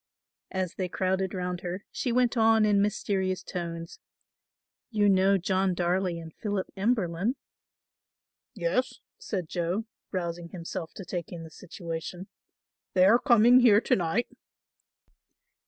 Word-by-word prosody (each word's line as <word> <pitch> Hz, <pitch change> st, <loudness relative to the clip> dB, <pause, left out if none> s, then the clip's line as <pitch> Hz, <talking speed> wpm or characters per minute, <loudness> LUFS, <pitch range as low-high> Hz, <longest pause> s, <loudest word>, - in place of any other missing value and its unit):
As 185 Hz, -2 st, -2 dB
they 185 Hz, -2 st, -3 dB
crowded 190 Hz, +1 st, -1 dB
round 180 Hz, -1 st, -3 dB
her 180 Hz, +3 st, -5 dB
she 250 Hz, -, -2 dB
went 250 Hz, +1 st, +2 dB
on 225 Hz, -1 st, +5 dB
in 205 Hz, -1 st, +4 dB
mysterious 190 Hz, -2 st, -1 dB
tones, 170 Hz, -2 st, -6 dB, 0.9 s
"You 210 Hz, -3 st, +2 dB
know 195 Hz, 0 st, +4 dB
John 190 Hz, 0 st, +1 dB
Darley 180 Hz, 0 st, 0 dB
and 165 Hz, -1 st, -9 dB
Philip 205 Hz, -3 st, -2 dB
Emberlin." 200 Hz, 0 st, 0 dB, 1.2 s
"Yes," 195 Hz, +7 st, 0 dB, 0.2 s
said 185 Hz, -6 st, -4 dB
Joe, 175 Hz, +6 st, -2 dB, 0.3 s
rousing 170 Hz, -2 st, -3 dB
himself 170 Hz, -1 st, -6 dB
to 195 Hz, -, -8 dB
take 175 Hz, -2 st, -5 dB
in 170 Hz, -2 st, -7 dB
the 160 Hz, -, -11 dB
situation, 175 Hz, +1 st, -7 dB, 0.7 s
"they 185 Hz, 0 st, +6 dB
are 225 Hz, +5 st, +6 dB
coming 240 Hz, -1 st, +6 dB
here 225 Hz, -5 st, +6 dB
to -, -, +2 dB
night." 180 Hz, +7 st, 0 dB
185 Hz, 130 wpm, -28 LUFS, 175-210 Hz, 1.2 s, they